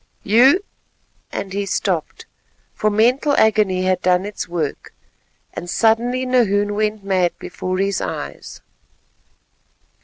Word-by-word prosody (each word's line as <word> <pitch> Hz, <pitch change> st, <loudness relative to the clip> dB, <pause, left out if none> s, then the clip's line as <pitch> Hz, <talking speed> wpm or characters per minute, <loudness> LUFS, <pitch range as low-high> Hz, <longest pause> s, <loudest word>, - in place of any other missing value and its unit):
You——" 260 Hz, -, +5 dB, 0.7 s
and 190 Hz, -1 st, -5 dB
he 200 Hz, 0 st, -2 dB
stopped, -, -, -2 dB, 0.5 s
for 215 Hz, -, 0 dB
mental 245 Hz, +7 st, +2 dB
agony 210 Hz, -4 st, +3 dB
had 185 Hz, -1 st, +1 dB
done 180 Hz, +1 st, +2 dB
its 205 Hz, -1 st, -5 dB
work, 170 Hz, -4 st, -4 dB, 0.6 s
and 175 Hz, -, -7 dB
suddenly 235 Hz, +5 st, +1 dB
Nahoon 205 Hz, -5 st, +2 dB
went 210 Hz, 0 st, -1 dB
mad 185 Hz, -3 st, 0 dB
before 185 Hz, 0 st, -4 dB
his 195 Hz, +1 st, 0 dB
eyes. -, -, -6 dB
205 Hz, 115 wpm, -20 LUFS, 185-225 Hz, 0.7 s, You